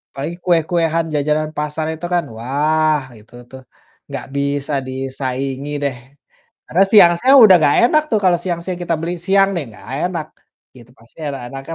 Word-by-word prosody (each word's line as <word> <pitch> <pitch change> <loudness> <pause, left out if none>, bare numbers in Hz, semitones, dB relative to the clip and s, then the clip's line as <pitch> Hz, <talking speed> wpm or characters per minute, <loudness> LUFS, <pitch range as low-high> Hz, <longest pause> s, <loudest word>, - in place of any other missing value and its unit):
Paling 150 +5 -5
kue-kuean, 165 -1 +1
jajanan 150 +1 -1
pasar, 150 +1 -3
itu 160 +2 -7
kan, 175 -1 +2
wah, 150 +5 0 0.2
itu 105 +3 -22 0.2
tuh 130 0 -11 0.5
gak - - -5
bisa 140 +1 -2
disaingi 135 +1 -4
deh. 140 -3 -2 0.7
Karena 185 - +2
siang-siang 210 +7 +6
udah 205 -5 +8
gak 145 - +3
enak 305 +4 +2
tuh, 220 - +2
kalau 180 -2 +4
siang-siang 175 0 -4
kita 170 -1 -1
beli, 170 +2 -3
siang 195 +3 +2
nih, 165 - -2
gak - - -15 0.2
enak 165 -4 -5 0.5
gitu, 120 -1 -16
pasti 115 +6 -22
enak-enaknya 135 +2 -6
155 Hz, 155 wpm, -18 LUFS, 135-175 Hz, 0.7 s, udah